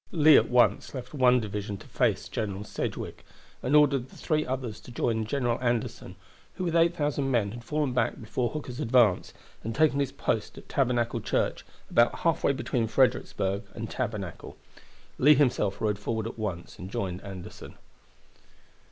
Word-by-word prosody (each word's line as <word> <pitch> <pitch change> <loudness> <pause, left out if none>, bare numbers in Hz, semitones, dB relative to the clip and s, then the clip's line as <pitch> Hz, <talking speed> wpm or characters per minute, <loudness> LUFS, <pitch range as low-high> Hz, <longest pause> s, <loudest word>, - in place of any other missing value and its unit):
Lee 155 -3 +6
at - - +5
once 120 0 +3
left 125 +1 -7
one 125 -3 +4
division 105 -2 -4
to - - -14
face - - 0
General 100 -2 -3
Sedgwick, - - -5 0.4
and 135 +4 +1
ordered 140 -4 +4
the - - -16
three 155 -1 0
others 125 -5 -4
to - - -13
join 115 -2 0
General 120 -2 0
Anderson, 120 -6 -2 0.4
who 185 - -4
with 170 -2 -1
8,000 150 -5 +2
men 115 -6 +1
had 120 +2 -9
fallen 150 0 -1
back 125 - 0
before 120 +1 -2
Hooker's 135 -4 -6
advance, 115 -8 +3 0.3
and 115 +1 -4
taken 150 -2 +3
his 140 -2 0
post - - -2
at - - -12
Tabernacle 120 -3 0
Church, - - -1 0.2
about 120 0 +3
halfway 165 -4 +2
between 125 -3 -1
Fredericksburg 100 -5 +1
and 110 0 -5
Tabernacle. 105 -8 -5 0.6
Lee 150 +3 +7
himself 125 -8 +1
rode 105 -2 0
forward 110 +1 -2
at 115 - -6
once 95 -6 -5
and 90 - -7
joined 95 -2 -3
Anderson. 95 -3 -9
120 Hz, 160 wpm, -28 LUFS, 105-140 Hz, 0.6 s, Lee